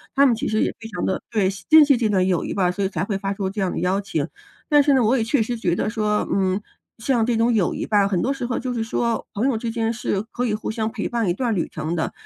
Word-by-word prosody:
她 280 +1 +6
们 255 - +4
其 265 +6 -3
实 215 0 +1
也 - - 0
非 225 -1 -8
常 210 - -3
地 190 - -1
对， 210 -4 +1
惜 195 - -10
珍 315 -1 +9
惜 280 -1 +4
这 230 -3 0
段 190 -3 +2
友 180 -3 +1
谊 - - -4
吧， 180 -3 +2
所 200 +2 -3
以 190 - 0
才 180 -3 -2
会 200 -1 -2
发 195 0 -2
出 195 -1 -2
这 205 0 -4
样 185 -2 0
的 - - -4
邀 185 +3 +1
请。 175 -7 -2 0.4
但 295 -2 +5
是 285 -1 +3
呢， 260 - +3
我 225 +4 +3
也 235 - +1
确 230 +1 +1
实 240 +2 -3
觉 180 -7 0
得 - - -1
说， 210 -1 0
嗯， 190 0 +1 0.4
像 235 0 +1
这 235 0 +1
种 230 +2 +3
友 205 -6 +1
谊 - - -3
吧， 205 -2 +3
很 190 -3 0
多 270 - +1
时 260 -3 -4
候 245 - -2
就 250 0 -3
是 230 -2 -1
说 230 0 -1
朋 220 +6 +1
友 270 - +1
之 230 - -3
间 225 0 -1
是 215 -4 -2
可 245 +1 -1
以 210 - 0
互 215 - -4
相 220 0 -2
陪 220 -2 -3
伴 235 -5 -1
一 - - +2
段 240 +1 0
旅 175 - -1
程 155 +2 -3
的， 160 - -1
220 Hz, 335 characters per minute, -22 LUFS, 195-240 Hz, 0.4 s, 珍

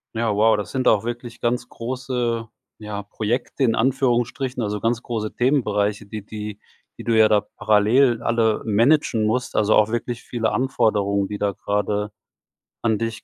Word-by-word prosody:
Ja, 110 -2 0
wow, 110 +1 +4
das 105 -3 -4
sind 130 -2 -1
auch 105 -1 +4
wirklich 120 0 -6
ganz 120 +1 0
große, 120 -2 -3 0.3
ja, 105 -1 -6
Projekte 115 +6 -2
in 115 -3 +3
Anführungsstrichen, 125 0 0
also, 105 -1 -2
ganz 115 +1 0
große 110 -3 -4
Themenbereiche, 105 -6 +1
die 105 0 -7
die 105 -1 -7 0.4
die - - -7
du 115 -1 +1
ja 110 - +7
da 105 -1 +3 0.2
parallel 115 +3 +3
alle 115 -2 +1
managen 115 +1 +3
musst, 125 +4 -1
also, 105 0 +3
auch 110 0 +4
wirklich 120 +1 -3
viele 115 -3 -2
Anforderungen, 100 -6 +1
die 105 0 -6
da 100 -1 0
grade 105 +1 -2 0.7
an 110 -2 +1
dich 115 -1 -4
110 Hz, 165 wpm, -22 LUFS, 105-120 Hz, 0.7 s, ja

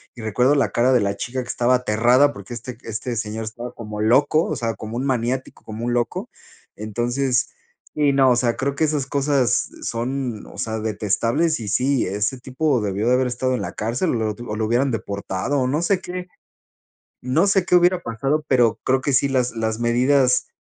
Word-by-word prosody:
y 120 - -9
recuerdo 125 +5 +2
la 140 - +2
cara 125 +2 +3
de 125 - +5
la 100 0 -1
chica 130 +2 -3
que - - -14
estaba 125 +1 +2
aterrada 125 +4 +3
porque 120 - -9
este 120 0 -8
este 115 +2 -4
señor 110 0 -4
estaba 120 +3 -7
como 105 -2 -7
loco, 145 +8 +3
o 155 - -2
sea, 115 -3 -2
como 110 +1 -7
un 130 - -2
maniático, 130 0 -2
como 110 +1 -6
un 120 - 0
loco, 120 -1 -2 0.5
entonces 120 +4 -1 0.5
sí, 150 -2 +3
no, 135 -1 +5
o - - +4
sea, 120 -1 +1
creo 140 +2 -1
que 150 - 0
esas 145 -3 -1
cosas 140 -3 +1
son, 120 -1 -3
o - - -13
sea, 110 0 -2
detestables, 115 - 0
y 110 - -6
sí, 130 +5 +1
ese 105 +6 -1
tipo 130 +2 0
debió 100 +2 -1
de 125 - +4
haber 130 0 +2
estado 130 +1 -1
en 120 - -3
la 90 - -5
cárcel 120 +11 -1
o - - -1
lo 110 -2 -1 0.2
o - - -2
lo 110 - 0
hubieran 125 +5 +1
deportado 100 +3 -2
o - - +1
no 145 +5 0
sé 190 +2 +2
qué 180 0 -6 1.0
no 135 +9 +2
sé 195 -2 +3
qué - - +2
hubiera 175 +1 +4
pasado, 135 +6 -1
pero 120 -4 +3
creo 130 0 +2
que 140 - 0
sí, 140 +2 +3
las 130 -2 0
las 110 0 -1
medidas 125 +2 +3
125 Hz, 205 wpm, -22 LUFS, 115-135 Hz, 1.0 s, de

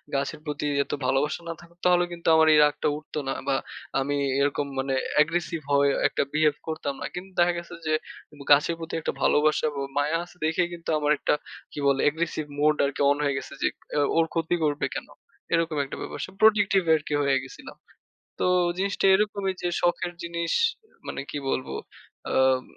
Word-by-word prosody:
গাছের 140 +1 -2
প্রতি 150 -1 -3 0.2
এত - - -10
ভালোবাসা 145 +5 +1
না - - -2
থাকত 170 0 -18
তাহলে 180 0 +5
কিন্তু 170 -1 -7
আমার 160 0 +5
এই 150 - +6
রাগটা 150 0 0
উঠত 155 - -12
না। 135 - 0
বা 135 - +2 0.4
আমি 145 +2 -1 0.3
এরকম 145 0 +1
মানে 135 0 -1 0.3
Aggressive 165 0 -1
হয়ে 140 0 +4 0.2
একটা - - 0
বিহেভ 150 -1 +3
করতাম 155 -3 -3
না। - - -3
কিন্তু 190 +2 -7
দেখা 175 0 +4
গেছে 170 0 -7
যে, 155 - +2 0.4
উব 145 - -16
গাছের 150 +4 +5
প্রতি 165 0 -7
১ 165 - -5
টা - - +1
ভালোবাসা 155 +1 +3
এবং 140 -1 -4 0.2
মায়া 150 +3 +2
আছে 175 - -15
দেইখাই 165 +2 +1
কিন্তু 170 -1 -8
আমার 150 0 +1
১ - - -35
টা - - +6 0.4
কি - - -7
বলে 135 -1 +3
Aggressive 160 -1 -3
mode 150 0 +3
আরকি 140 +1 -3
অন 145 - +3
হয়ে 140 -2 +1
গেছে - - -7
যে - - +1
ইক - - -35 0.4
"ওর 165 - +5
ক্ষতি 165 +1 0
করবে 150 -1 +1
কেন?" - - -5 0.5
এরকম 165 -2 +1
একটা 135 - -7
ব্যাপার-স্যাপার 190 +1 -6
Protective 205 -3 +5
আরকি 155 -1 -3
হয়ে 140 -1 +3
গেছিলাম। 130 - -11 0.6
তো - - +1 0.3
জিনিসটা 195 0 0
এরকমই 200 -2 0
যে 175 - 0
শখের 175 0 +1
জিনিস 170 0 -3 0.6
মানে - - -4
কি 145 - -3
বলবো 130 - -2 0.6
আম 130 -1 +3
155 Hz, 190 wpm, -26 LUFS, 145-170 Hz, 0.6 s, এই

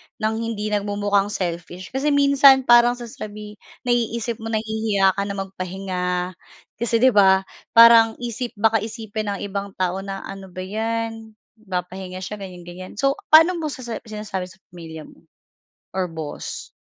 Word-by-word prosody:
nang 220 +1 -1
hindi 215 -2 -3
nagmumukhang 205 -1 +1
selfish? 175 -1 -5
Kasi 270 +3 -1
minsan, 280 -2 +6
parang 240 0 +6
sasabi 210 -3 -9 0.2
naiisip 235 -1 -1
mo, 225 - -6
nahihiya 220 -3 +1
ka - - +1
na 200 - -4
magpahinga. 190 -1 -4 0.7
Kasi, 230 0 +1
'di 260 - +7
ba, 190 -2 +5 0.3
parang 230 -1 +8
isip 240 0 -5
baka 225 +1 +3
isipin 220 0 -5
ng 200 -1 -2
ibang 200 0 -5
tao 185 0 -1
na 195 0 -6
ano 195 -1 -8
ba 185 0 -7
'yan, 225 +2 -4 0.3
nagpapahinga 185 0 -5
siya, 210 +2 -6
ganyan-ganyan. 180 -1 -9
So, 275 +5 0
paano 330 +3 +6
mo 310 - -2
sasa 245 -5 -5
sinasabi 210 -4 -5
sa 180 - -16 0.2
pamilya 160 -3 -9
mo? - - -17 0.8
Or 180 -3 -1
boss? 155 -2 -6
210 Hz, 145 wpm, -22 LUFS, 190-230 Hz, 0.8 s, parang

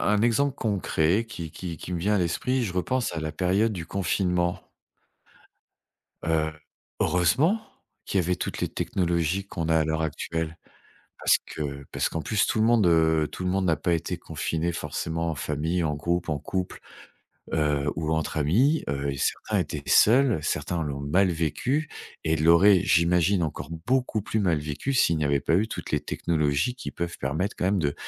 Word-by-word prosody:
un 105 - +1
exemple 135 +4 +2
concret 100 - +1
qui 85 -8 -7
qui 85 -1 -6
qui 90 - -6
me 85 - -2
vient 105 +5 +1
à - - +3
l'esprit, 120 +9 0
je 95 -6 -3
repense 115 +7 -1
à - - -2
la 80 0 -3
période 95 +8 +1
du 85 -5 -5
confinement 90 -1 0 1.6
heu, 80 -1 +1 0.5
heureusement, 135 - +3 0.5
qu'il 100 - 0
y - - -3
avait 90 +2 0
toutes - - -4
les - - +1
technologies 85 +1 -1
qu'on 85 -4 -4
a 80 - +4
à - - +3
l'heure 80 +1 -1
actuelle, 80 +1 -3 0.6
parce - - +4
que 70 -2 -5
parce - - 0
qu'en 80 - -3
plus 105 +4 +1
tout - - 0
le - - +4
monde, 115 -3 +4
heu, 80 -2 +3
tout - - -7
le 90 - 0
monde 95 +1 +1
n'a 85 -3 +3
pas 85 +4 0
été 85 0 -2
confiné 80 +1 -2
forcément 80 +1 -3
en - - -5
famille, 75 +5 -1
en 75 -2 0
groupe, 85 +3 -1
en 75 -2 -1
couple, 95 +4 -4 0.7
heu, 75 -2 +1
ou 80 0 -2
entre 80 0 -1
amis 115 - +3
heu 70 0 -1
et 70 - -5
certains - - -1
étaient - - -3
seuls, 120 - +5
certains 85 +2 -2
l'ont 70 -2 -4
mal 90 +7 +2
vécu 90 - -1 0.3
et 80 - +1
l'auraient, 85 +5 +6
j'imagine, 85 +3 +3
encore 75 -2 -4 0.2
beaucoup 125 -3 +1
plus 110 - -1
mal 90 -6 +2
vécu 75 - -3
s'il 85 -10 +3
n'y 75 - 0
avait 70 -1 +2
pas 80 - +2
eu 105 +5 +2
toutes - - -6
les 75 - +2
technologies 75 - 0
qui 130 - -6
peuvent 85 0 -4
permettre 80 +10 -2
quand - - -2
même 95 +1 +2
de 75 -4 0
85 Hz, 190 wpm, -26 LUFS, 80-100 Hz, 1.6 s, l'auraient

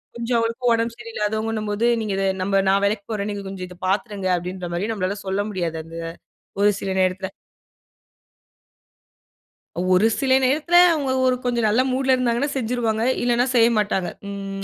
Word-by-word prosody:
கொஞ்சம் 235 +1 -2
அவுங்களுக்கும் 230 +2 0
உடம்பு 230 0 -1
சரியில்லாதவங்கன்னும்போது, 220 -1 -2 0.2
நீங்க 215 -2 -2
இத 195 - 0 0.2
நம்ம 195 +1 +2
நான் 195 +1 +3
வேலைக்கு 200 0 -1
போறேன், 210 -1 -2
நீங்க 200 -1 -5
கொஞ்சம் 190 -1 -6
இத 180 0 -13
பார்த்துருங்க 200 -1 -1
அப்பிடின்றமாரி 180 +2 -4
நம்மளால 200 -1 -2
சொல்ல 190 +1 0
முடியாது 170 -4 -3
அந்த 165 +1 -12 0.7
ஒரு 205 - +6
சில 195 - -3
நேரத்தில. 185 +1 0 2.5
ஒரு 185 +3 +3
சில 265 -1 +4
நேரத்துல, 305 +7 +3 0.2
அவுங்க 285 -4 -1
ஒரு 255 -1 +3
கொஞ்சம் 240 -2 0
நல்ல 220 +4 +3
மூட்‌ 260 +1 -1
ல 260 - +5
இருந்தாங்கன்னா 250 +2 0
செஞ்சுருவாங்க. 230 -3 -1 0.2
இல்லன்னா, 240 0 +2
செய்யமாட்டாங்க. 215 -6 +2 0.2
ம் 195 0 -5
215 Hz, 150 wpm, -22 LUFS, 195-240 Hz, 2.5 s, ஒரு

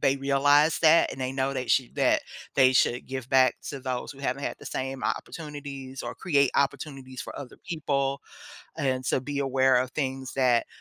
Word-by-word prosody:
they 135 +1 +3
realize 145 +3 +3
that 165 0 +5
and 130 - -8
they 130 0 -2
know 135 0 -1
they 130 -2 -3
shou 130 -1 +2
that - - +2 0.3
they 130 -1 +5
should 125 -1 +2
give 130 -1 -5
back 130 -1 +4
to 140 -2 -5
those 130 +1 -4
who 135 - -17
haven't 140 0 -2
had - - -2
the - - -11
same 130 0 -4
opportunities 140 -4 -5
or - - -5
create 140 -7 +2
opportunities 135 -2 -2
for - - -7
other 130 -3 -9
people, 140 -4 -1 0.5
and 130 -4 -1
to 130 - +1
be 145 +1 -4
aware 130 -1 +3
of 130 +1 +1
things 135 -3 -3
that 125 -3 +3
135 Hz, 190 wpm, -27 LUFS, 130-140 Hz, 0.5 s, that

